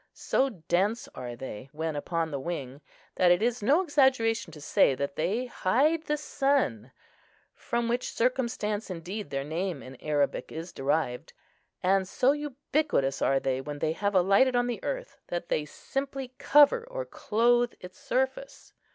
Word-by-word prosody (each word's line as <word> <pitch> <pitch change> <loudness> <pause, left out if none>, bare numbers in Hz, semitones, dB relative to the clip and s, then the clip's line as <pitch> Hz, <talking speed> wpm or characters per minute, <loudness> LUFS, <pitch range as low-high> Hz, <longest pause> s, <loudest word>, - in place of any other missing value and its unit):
So 270 - +1
dense 195 +3 -1
are 125 -1 -7
they, 130 0 -8
when 160 0 -3
upon 165 +2 -2
the 140 - -3
wing, 140 -3 -5 0.4
that 180 - +5
it 175 +4 +4
is 240 0 0
no 285 - +4
exaggeration 260 - +2
to 150 - -11
say 140 -1 +3
that 140 +1 -3
they 200 +11 0
hide 280 - +1
the 300 - 0
sun, 270 - 0 0.6
from 235 0 -2
which 240 +2 -1
circumstance 230 -4 -1
indeed 185 +2 -5
their 135 0 -2
name 165 +1 -3
in 130 0 -11
Arabic 145 -2 0
is 165 +2 -7
derived. 135 -2 -1 0.5
And 190 +1 +3
so 255 +7 +3
ubiquitous 290 - -1
are 135 0 +3
they 130 -1 -1
when 145 +1 -6
they 155 +2 0
have 200 +4 -1
alighted 200 +8 +4
on 245 0 +3
the 245 -1 -4
earth, - - -4
that 175 0 -4
they 150 - 0
simply 270 - -5
cover 295 - +5
or - - -4
clothe 240 +2 +2
its 180 0 -11
surface. 265 - -2
200 Hz, 160 wpm, -28 LUFS, -, 0.6 s, that